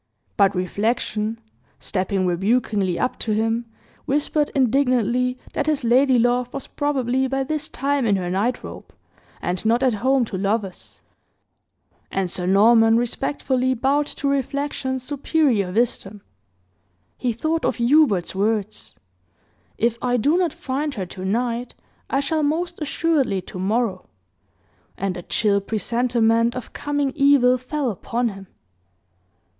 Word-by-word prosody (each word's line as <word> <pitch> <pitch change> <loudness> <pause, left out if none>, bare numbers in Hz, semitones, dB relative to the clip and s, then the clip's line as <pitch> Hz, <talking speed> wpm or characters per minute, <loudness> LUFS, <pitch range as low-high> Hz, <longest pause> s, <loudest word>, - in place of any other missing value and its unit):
But 200 -2 +3
reflection, 215 +3 -1 0.4
stepping 190 -1 -1
rebukingly 195 0 +1
up 255 - -1
to 220 - -1
him, 225 +2 0 0.4
whispered 295 +1 0
indignantly, 250 -1 +2 0.2
that 290 - -1
his 300 -4 0
ladylove 245 0 +3
was 275 - -5
probably 265 -3 0
by 270 +1 -1
this 300 +2 -3
time 275 -2 0
in 205 - +3
her 180 -2 -2
night 210 +7 -1
robe, - - -10 0.5
and 180 0 -2
not 230 +3 +2
at 255 -3 +3
home 260 +4 +2
to 190 -4 -5
lovers; 200 -1 -3 1.1
and 190 -2 -1
Sir 180 -1 -3
Norman 225 +3 +5
respectfully 255 +1 -1
bowed 280 +4 +1
to 280 - -3
reflection's 275 -1 -2
superior 275 - +1
wisdom. 210 -2 -1 0.9
He 250 - -1
thought 315 +8 -1
of - - +1
Hubert's 240 - +3
words, 210 +1 -2 0.8
"If 235 0 0
I 245 0 +1
do 285 +8 +2
not 355 -3 +1
find 280 +2 -3
her 195 -4 -3
tonight, 230 +7 -3 0.3
I 275 - +1
shall 310 +3 0
most 335 +3 -1
assuredly 295 - +1
to 185 - -9
morrow," 200 0 -1 0.9
and 195 -1 -2
a 175 - -6
chill 200 +2 +1
presentiment 230 +2 +1
of 250 - -7
coming 290 -2 -1
evil 275 -3 +4
fell 260 0 -2
upon 235 +5 -2
him. 195 -2 -10
240 Hz, 130 wpm, -22 LUFS, 210-275 Hz, 1.1 s, Norman